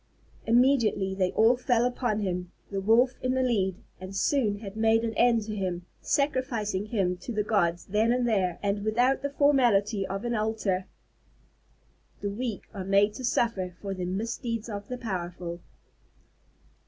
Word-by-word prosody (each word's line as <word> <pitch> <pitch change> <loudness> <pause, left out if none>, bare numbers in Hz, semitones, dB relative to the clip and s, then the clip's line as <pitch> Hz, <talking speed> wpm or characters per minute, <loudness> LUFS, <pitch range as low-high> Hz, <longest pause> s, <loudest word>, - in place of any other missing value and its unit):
Immediately 235 -5 +3
they 185 -1 0
all 225 +3 +5
fell 245 -1 +1
upon 245 -3 -1
him, 180 -2 -3 0.2
the 195 -1 -2
Wolf 235 +5 +4
in 255 0 0
the 260 - +2
lead, 195 -7 +1 0.2
and 185 +1 -8
soon 215 -2 +1
had 200 -1 -8
made 225 +1 +3
an 225 -1 -1
end 230 0 +3
to 215 0 -5
him, 180 -3 -3 0.2
sacrificing 245 -8 0
him 190 -5 0
to 240 - -7
the 210 -2 0
gods 175 -5 +1
then 215 +4 +2
and 245 0 +1
there, 190 -6 +1
and 200 0 0
without 245 +5 +2
the 280 - -2
formality 240 -8 +3
of 195 +4 -4
an 240 - -1
altar. 215 -4 -1 1.4
_The 200 0 -2
weak 230 -4 -3
are 195 -3 -5
made 200 +2 +3
to 255 - -8
suffer 195 -7 0
for 195 -1 -4
the 185 -1 -4
misdeeds 230 +4 -3
of 205 -1 -6
the 250 - -4
powerful. 175 -5 -5
215 Hz, 165 wpm, -28 LUFS, 195-240 Hz, 1.4 s, all